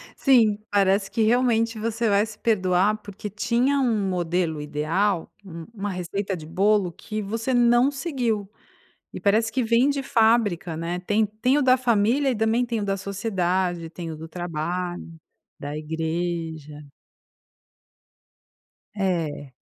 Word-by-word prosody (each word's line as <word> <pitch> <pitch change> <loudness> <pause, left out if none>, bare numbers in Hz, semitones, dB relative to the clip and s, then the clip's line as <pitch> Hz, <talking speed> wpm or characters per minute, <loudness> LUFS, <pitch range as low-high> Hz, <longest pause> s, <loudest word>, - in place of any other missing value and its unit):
Sim, 230 -6 +4
parece 195 0 +2
que 225 - -1
realmente 230 -1 +2
você 225 0 -1
vai 200 +1 +3
se 220 - -11
perdoar 195 -1 +2
porque 205 0 -8
tinha 240 +7 +1
um 220 -7 +1
modelo 175 -3 -1
ideal, 160 +6 -1
u 165 -3 -8
uma 205 -2 -4
receita 190 +2 -3
de 160 -3 -9
bolo 195 +2 +2
que 215 +5 -6
você 225 +5 -2
não 240 +2 +4
seguiu. 245 - -2 0.6
E - - -7
parece 220 +3 +2
que 260 - 0
vem 235 +4 +3
de 280 -1 -1
fábrica, 220 -8 +2
né. 170 +2 -3
Tem 210 +4 +1
tem 220 +6 0
o - - +2
da 255 0 +5
família 245 +3 +2
e - - -1
também 225 +3 +1
tem 235 -2 -2
o 205 - -2
da 195 -1 0
sociedade, 185 -4 -2
tem 170 -1 -7
o 155 - -6
do 160 +1 -8
trabalho, 175 +1 -4 0.5
da 145 +1 -5
igreja. 160 -2 -4 2.1
É. 165 -8 -2
200 Hz, 145 wpm, -24 LUFS, 175-230 Hz, 2.1 s, da